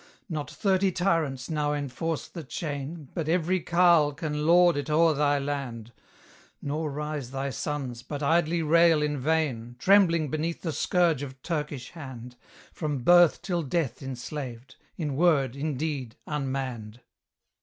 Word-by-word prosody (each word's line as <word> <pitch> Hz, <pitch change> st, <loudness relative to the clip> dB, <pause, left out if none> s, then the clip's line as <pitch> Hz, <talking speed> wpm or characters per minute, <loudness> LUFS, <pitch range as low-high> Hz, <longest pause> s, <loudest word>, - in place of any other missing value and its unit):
Not 155 Hz, -6 st, -4 dB
thirty 195 Hz, -2 st, +1 dB
tyrants 165 Hz, -8 st, 0 dB
now 150 Hz, -2 st, 0 dB
enforce 150 Hz, +3 st, -3 dB
the 160 Hz, +1 st, -8 dB
chain, 145 Hz, 0 st, -5 dB
But 160 Hz, -2 st, -3 dB
every 180 Hz, +2 st, +2 dB
carle 170 Hz, -4 st, +4 dB
can 150 Hz, 0 st, -3 dB
lord 175 Hz, 0 st, +6 dB
it 145 Hz, +2 st, -3 dB
o'er 160 Hz, +1 st, +4 dB
thy 145 Hz, 0 st, +2 dB
land; 135 Hz, -5 st, -4 dB, 0.7 s
Nor 150 Hz, +2 st, -3 dB
rise 150 Hz, -2 st, -4 dB
thy 135 Hz, +1 st, -3 dB
sons, 130 Hz, -2 st, -4 dB
but 145 Hz, +3 st, -6 dB
idly 165 Hz, +2 st, +2 dB
rail 165 Hz, 0 st, +5 dB
in 150 Hz, -1 st, -1 dB
vain, 130 Hz, -5 st, -1 dB
Trembling 170 Hz, -3 st, +4 dB
beneath 160 Hz, +2 st, -2 dB
the 165 Hz, -3 st, -2 dB
scourge 165 Hz, 0 st, +2 dB
of 135 Hz, -2 st, -7 dB
Turkish 150 Hz, -6 st, -4 dB
hand, 125 Hz, -6 st, -9 dB, 0.4 s
From 145 Hz, -6 st, -3 dB
birth 175 Hz, +2 st, +6 dB
till 175 Hz, -4 st, -1 dB
death 145 Hz, -4 st, -2 dB
enslaved; 130 Hz, -1 st, -6 dB, 0.2 s
in 150 Hz, -5 st, -2 dB
word, 145 Hz, -5 st, +3 dB
in 145 Hz, -1 st, -3 dB
deed, 135 Hz, -6 st, -3 dB
unmanned. 130 Hz, -6 st, -4 dB
150 Hz, 145 wpm, -27 LUFS, 135-165 Hz, 0.7 s, lord